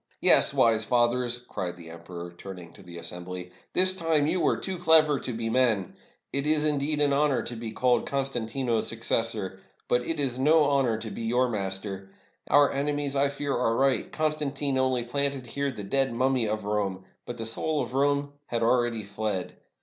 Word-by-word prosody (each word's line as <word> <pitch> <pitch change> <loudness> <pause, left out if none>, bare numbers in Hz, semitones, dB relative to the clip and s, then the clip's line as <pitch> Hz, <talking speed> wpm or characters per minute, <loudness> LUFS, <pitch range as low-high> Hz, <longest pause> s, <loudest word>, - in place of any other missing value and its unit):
"Yes, - - +6
wise 115 -1 +3
fathers," 120 +1 +1
cried 90 -1 -4
the 85 -2 -11
emperor, 85 +1 -9
turning 90 -2 -10
to - - -15
the 85 -2 -11
assembly, 90 +1 -7 0.2
"this 185 0 +5
time 165 -4 +2
you 170 +4 0
were - - +2
too 190 -2 -5
clever 155 -4 +5
to - - -5
be 115 -1 -4
men. 115 -6 +1 0.4
It 140 +1 +3
is, 155 0 +4
indeed, 150 0 +1
an 145 -1 +3
honor 140 -2 +2
to 120 - -6
be 115 -1 -6
called 125 +2 +1
Constantino's 125 -3 -2
suc 115 0 -7
cessor, 105 -5 -1 0.3
but 125 - +2
it 155 +5 -1
is 130 -3 0
no 155 +3 +4
honor 135 -5 +1
to 110 -1 -6
be - - -7
your 120 +3 +1
master! 95 -2 -4 0.4
Our 145 -1 +5
ene 145 +1 -1
mies, 145 -1 -2
I 140 0 +2
fear, 140 0 -3
are 115 -2 +1
right; 135 +1 +1
Constantine 145 -3 -1
only 130 -2 +1
planted 140 +1 -2
here 140 +3 -3
the 105 -5 -8
dead 135 +6 +2
mummy 130 -1 +1
of 105 -1 -3
Rome, 100 -3 -2 0.2
but 120 - -6
the 115 - -5
soul 150 +7 -1
of 120 - -8
Rome 140 +1 +1
had 115 -1 -2
al 120 +2 +4
ready 115 -2 -2
fled. 100 -2 -4
125 Hz, 195 wpm, -27 LUFS, 110-140 Hz, 0.4 s, Yes